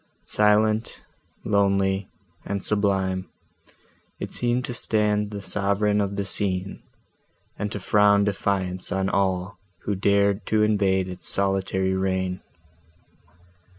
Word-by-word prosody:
Silent, 105 +1 +2 0.4
lonely, 100 -1 +1 0.3
and 100 -1 -4
sublime, 95 -3 0 0.9
it - - -5
seemed 120 +1 0
to 125 - -5
stand 105 -2 0
the 105 -1 -6
sovereign 105 +1 +1
of 100 0 -2
the 100 0 -2
scene, 95 -1 -1 0.8
and 105 0 -2
to 105 - -4
frown 100 +1 +4
defiance 95 -2 -2
on 95 0 0
all, 95 0 -1 0.2
who 100 - -1
dared 100 +1 +2
to 110 -1 +2
invade 100 -3 +2
its 90 -1 -4
solitary 95 -1 +1
reign. 95 -1 -1
100 Hz, 115 wpm, -24 LUFS, 95-105 Hz, 0.9 s, frown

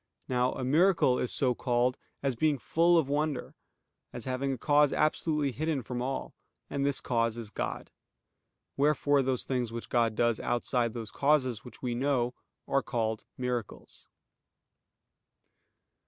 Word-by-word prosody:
Now 125 0 +1
a - - -5
miracle 155 -1 +4
is 125 - 0
so 130 -2 +2
called 125 +1 +1 0.3
as 135 -3 0
being 150 +3 +2
full 170 +7 +3
of 160 -5 +2
wonder; 145 0 -1 0.6
as 120 - -7
having 130 +1 -1
a 130 - -2
cause 145 +2 +4
absolutely 155 -2 +1
hidden 150 0 -2
from 120 +2 -4
all: 135 +2 -3 0.4
and 140 - -1
this 140 -1 +1
cause 115 -2 0
is 110 -3 -7
God. - - -4 0.8
Wherefore 145 0 +3
those 130 -1 0
things 125 -3 -2
which 115 0 -6
God 115 -3 +2
does 120 0 +2
outside 120 -1 0
those 115 -2 -5
causes 135 -6 +1
which 125 -1 -13
we 125 -1 -1
know, 125 -1 0 0.3
are 140 - +2
called 110 -4 -2
miracles. 125 -3 -5
130 Hz, 145 wpm, -30 LUFS, 120-145 Hz, 0.8 s, miracle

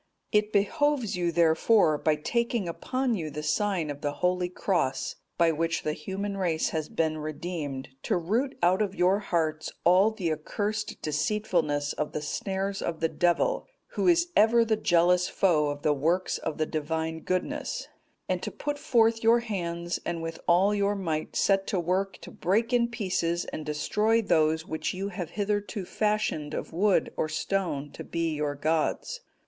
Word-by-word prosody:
"It 210 -1 +2
behoves 240 +3 +1
you, 175 -1 0
therefore, 165 +2 +4
by 155 -1 +2
taking 235 +5 -1
upon 255 +9 -1
you 165 -7 -2
the 150 +1 -6
sign 165 0 0
of 145 0 -8
the 145 -1 -1
Holy 180 +2 0
Cross, 180 -7 -1 0.2
by 170 -1 +4
which 165 +1 -1
the 155 - 0
human 195 +6 -4
race 170 -4 0
has 155 -1 -3
been 155 -1 0
redeemed, 150 -3 -5
to - - 0
root 225 +11 -1
out 185 +3 +4
of 200 -2 -1
your 185 +3 +3
hearts 160 -5 -1
all 185 +5 +5
the 195 -7 -2
accursed 210 +7 -3
deceitfulness 155 -2 0
of 150 - -3
the 150 - -2
snares 195 +5 -2
of 165 -2 -3
the 165 - +1
Devil, 175 - +1 0.2
who - - -1
is 345 0 +4
ever 230 +2 +5
the 220 -1 +2
jealous 180 -2 +3
foe 160 -6 +2
of 145 0 -4
the 150 - +3
works 165 +6 0
of 160 - -4
the 155 - +1
Divine 160 +1 -2
Goodness, 185 - -2 0.4
and - - -1
to - - -3
put 290 0 -4
forth 225 -4 +3
your 230 +1 +5
hands 175 -6 -3
and 170 -1 -3
with 165 0 -5
all 185 +4 +4
your 200 0 +1
might 160 -5 -3
set 195 -1 +2
to 195 - 0
work 185 +3 -1
to - - -10
break 225 +7 0
in 240 -1 +4
pieces 185 -7 -1
and 155 - -6
destroy 210 +9 +1
those 160 -6 +2
which 160 +3 -3
you 195 +2 -3
have 180 -4 -5
hitherto 205 0 -2
fashioned 210 -8 -1
of - - -5
wood 190 -1 +2
or 155 - -1
stone 155 -4 -2
to - - -8
be 165 -1 -2
your 150 -1 -2
gods. 160 - -1
180 Hz, 175 wpm, -28 LUFS, 160-210 Hz, 0.4 s, all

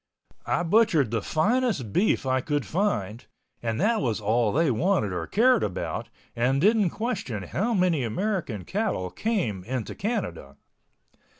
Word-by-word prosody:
I 175 - +1
butchered 170 - +3
the 115 -2 0
finest 195 - 0
beef 195 -7 +2
I 130 0 +1
could 145 0 -1
find 125 - -1 0.4
and 115 -2 -2
that 220 +5 +2
was 115 -6 0
all 110 +1 +1
they 155 +2 +2
wanted 125 - +1
or 85 -2 -3
cared 245 +3 +4
about 95 - -3 0.3
and 125 +3 +1
didn't 210 +2 +4
question 160 - -3
how 215 - -1
many 180 -7 +2
American 130 - -2
cattle 185 - -2
came 180 - -1
into 120 +1 -4
Canada. 130 - -4
145 Hz, 140 wpm, -26 LUFS, -, 0.4 s, cared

